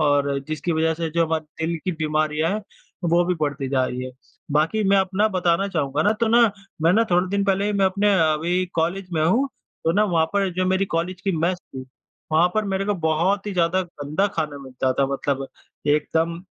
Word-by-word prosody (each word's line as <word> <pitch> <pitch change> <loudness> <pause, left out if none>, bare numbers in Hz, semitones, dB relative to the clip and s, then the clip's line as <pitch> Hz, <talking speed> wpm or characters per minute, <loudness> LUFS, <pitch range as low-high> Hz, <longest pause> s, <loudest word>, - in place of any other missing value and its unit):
और 145 -2 +2
जिसकी 155 +3 -2
वज़ह 160 0 +1
से 165 0 -3
जो 165 +1 +2
हमारे 160 0 -3
दिल 170 0 -1
की 185 - 0
बीमारियाँ 155 0 0
हैं 215 +1 -3 0.5
वो 170 +1 +4
भी 180 +1 0
बढ़ती 145 -2 -1
जा 130 -1 +2
रही 125 0 -4
है। 130 - -6 0.4
बाकी 160 +9 +2
मैं 200 - +5
अपना 190 +2 +2
बताना 180 -1 +1
चाहूँगा 150 -4 -1
ना, 210 - +3
तो 225 +1 -1
ना 235 +2 +5 0.4
मैं 165 +2 +5
ना 225 +3 +4
थोड़े 180 +1 +3
दिन 200 0 +1
पहले 195 0 +1
ही 210 - 0
मैं 200 -1 +2
अपने 200 +2 +2
अ, 155 -1 +3
वही 180 +2 +1
कॉलेज 175 +3 -1
में 155 - +1
हूँ 245 +12 +2 0.4
तो 165 - +3
ना 210 +3 +3
वहाँ 165 -5 +2
पर 200 -1 +1
जो 185 - 0
मेरी 190 +1 +2
कॉलेज 175 +2 -2
की 195 +1 -1
मेस 175 +3 0
थी, 130 -6 -10 0.5
वहाँ 170 +3 +5
पर 215 - +1
मेरे 195 0 -1
को 205 - 0
बहुत 180 +6 +1
ही 205 - -2
ज़्यादा 180 +1 +1
गंदा 160 +2 -2
खाना 150 -3 -2
मिलता 130 -1 -2
था। 135 +1 +1
मतलब 135 0 -2 0.4
एकदम, 160 +3 +1
170 Hz, 215 wpm, -23 LUFS, 155-195 Hz, 0.5 s, मैं